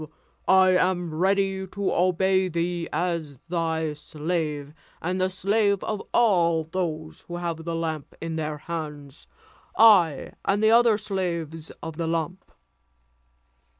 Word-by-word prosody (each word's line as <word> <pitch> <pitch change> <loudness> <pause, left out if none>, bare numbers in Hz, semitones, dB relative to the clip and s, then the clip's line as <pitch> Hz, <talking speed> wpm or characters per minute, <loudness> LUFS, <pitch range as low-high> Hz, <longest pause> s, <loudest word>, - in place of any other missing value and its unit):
I 190 0 +6
am 180 -2 +1
ready 190 +2 +1
to 200 +1 -2
obey 185 +1 +2
thee 170 0 -2
as 165 -3 -2
thy 160 -2 -1
slave, 150 -1 -3 0.3
and 185 +2 -2
the 185 - +2
slave 200 +1 +1
of 210 -2 -3
all 170 -8 +3
those 160 -2 -4
who 175 - -6
have 170 -2 -4
that 170 -1 -2
lamp 160 -3 -4
in 165 0 -4
their 155 -1 -3
hands; 150 -3 -7 0.5
I 190 -10 +5
and 205 +2 +1
the 220 - +5
other 230 -2 +5
slaves 170 -6 -3
of 160 -1 -6
the 165 - -2
lamp." 165 +3 -3
170 Hz, 130 wpm, -25 LUFS, 160-190 Hz, 0.5 s, I